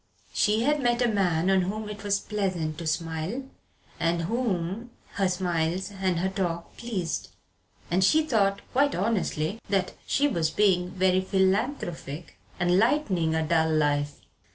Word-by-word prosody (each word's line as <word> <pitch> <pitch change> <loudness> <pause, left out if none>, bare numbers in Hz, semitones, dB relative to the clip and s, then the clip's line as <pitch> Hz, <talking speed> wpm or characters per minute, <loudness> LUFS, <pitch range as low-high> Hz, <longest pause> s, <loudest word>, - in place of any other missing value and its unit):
She 215 +2 +2
had 295 +2 +2
met 240 -1 +2
a - - +3
man 185 -5 +2
on 190 -1 +4
whom 210 +4 -3
it 210 -1 -7
was 200 0 +1
pleasant 185 -8 -2
to 165 - -4
smile, 165 +9 -2 0.6
and 170 0 +1
whom 210 0 -2 0.2
her 195 -2 +1
smiles 180 +1 -1
and 190 -3 -1
her 190 - +1
talk 175 -3 -3
pleased. 200 -9 -3 0.6
And 185 +2 +3
she 310 +12 +5
thought, 200 -7 +2
quite 280 +2 +2
honestly, 195 -2 -1
that 190 -2 +1
she 285 +1 +3
was 165 - 0
being 180 -3 +2
very 185 0 +2
philanthropic 190 - -1 0.2
and 180 +1 +3
lightening 205 - +2
a 160 -1 0
dull 160 -1 +2
life. 145 -1 +1
190 Hz, 150 wpm, -27 LUFS, 170-210 Hz, 0.6 s, she